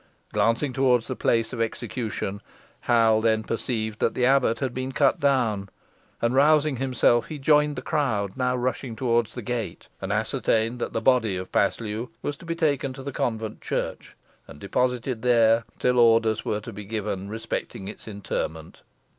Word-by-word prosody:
Glancing 115 +6 +1
toward 125 -3 +3
the - - -5
place 115 +2 +1
of 120 - -3
execution, 110 -3 -3 0.4
Hal 115 -2 +3
then 110 -1 +2
perceived 110 -1 -3
that - - +1
the 125 - +2
abbot 130 -3 +3
had 130 -2 -2
been 130 +1 -4
cut 140 0 +3
down, 115 -8 +1 0.5
and, 115 +1 +2
rousing 150 0 +4
himself, 125 -2 +2
he 155 - -6
joined 150 +1 +3
the 125 - -6
crowd 110 - -1
now 125 -1 0
rushing 125 -1 -2
towards 120 -2 0
the 125 - -5
gate, 120 0 -4
and - - -3
ascertained 115 +2 0
that - - -3
the 115 - -1
body 115 -6 +3
of 90 0 -7
Paslew 110 +3 0
was 145 - -2
to 170 - -14
be 165 - -2
taken 145 -5 0
to 135 0 -9
the 140 - -4
convent 110 -3 -3
church, - - -4 0.3
and 75 - -12
deposited 125 - -1
there 115 -2 +4
till 125 0 +2
orders 115 -2 +4
were 105 0 -2
to 115 +2 -8
be 105 +1 -7
given 100 -2 -3
respecting 110 -3 -5
its 105 - -9
interment. 80 -6 -5
115 Hz, 170 wpm, -25 LUFS, 110-130 Hz, 0.5 s, rousing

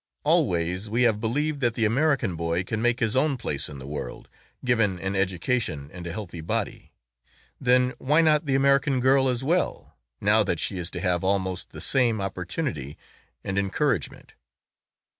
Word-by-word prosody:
Always 90 +4 +1
we 120 +3 +1
have 110 -3 +3
believed 145 +6 -1
that 120 -3 +1
the 115 - +1
American 135 - +1
boy 85 +2 -1
can 110 +3 -3
make 120 +1 +1
his 110 -1 +1
own 140 +1 +2
place 75 - -1
in 75 - -9
the 65 - -9
world, 75 +2 -7 0.4
given 115 -6 +2
an 95 +2 -3
education 95 - -1
and 90 -1 -7
a - - -4
healthy 90 -3 -6
body, 80 - -3 0.7
then 125 0 +3
why 150 +5 +3
not 155 -1 +3
the 135 - +2
American 140 0 +3
girl 130 +1 +3
as 125 0 -1
well, 170 +6 -1 0.2
now - - +4
that - - -1
she 95 - -1
is 85 0 -1
to 90 - -6
have 90 -1 +1
almost 95 -1 -1
the - - -9
same 120 -5 +3
opportunity 90 - -4 0.5
and 95 +1 -1
encouragement? 100 -1 -1
110 Hz, 170 wpm, -25 LUFS, 90-130 Hz, 0.7 s, now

